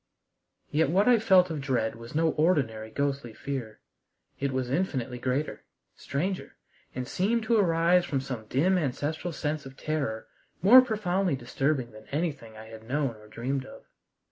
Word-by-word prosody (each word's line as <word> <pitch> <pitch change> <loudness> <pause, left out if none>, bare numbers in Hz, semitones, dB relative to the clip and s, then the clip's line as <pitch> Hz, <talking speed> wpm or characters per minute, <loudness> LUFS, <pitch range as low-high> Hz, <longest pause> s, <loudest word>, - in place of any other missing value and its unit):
Yet 155 -1 +2
what 195 +7 +3
I 245 -2 +6
felt 185 -4 +5
of 155 -3 -3
dread 125 -5 0
was 115 +4 -11
no 160 +1 +3
ordinary 135 -10 +1
ghostly 140 -2 -2
fear. 125 -6 -5 0.6
It 140 0 0
was 130 -1 -2
infinitely 130 -7 -1
greater, 130 +4 -2 0.3
stranger, 185 +7 -3 0.4
and 125 -1 -3
seemed 215 +10 0
to 230 +1 +2
arise 175 -1 +4
from 140 - -1
some 125 -5 -6
dim 180 - +2
ancestral 155 +4 -2
sense 155 -1 -3
of 135 0 -13
terror 140 -8 -2 0.4
more 245 +7 +10
profoundly 195 - 0
disturbing 130 0 -1
than 110 0 -14
anything 140 -8 -3
I 110 - -10
had 110 -1 -10
known 140 -3 0
or 105 0 -16
dreamed 130 +5 -3
of. - - -12
140 Hz, 160 wpm, -28 LUFS, 125-175 Hz, 0.6 s, more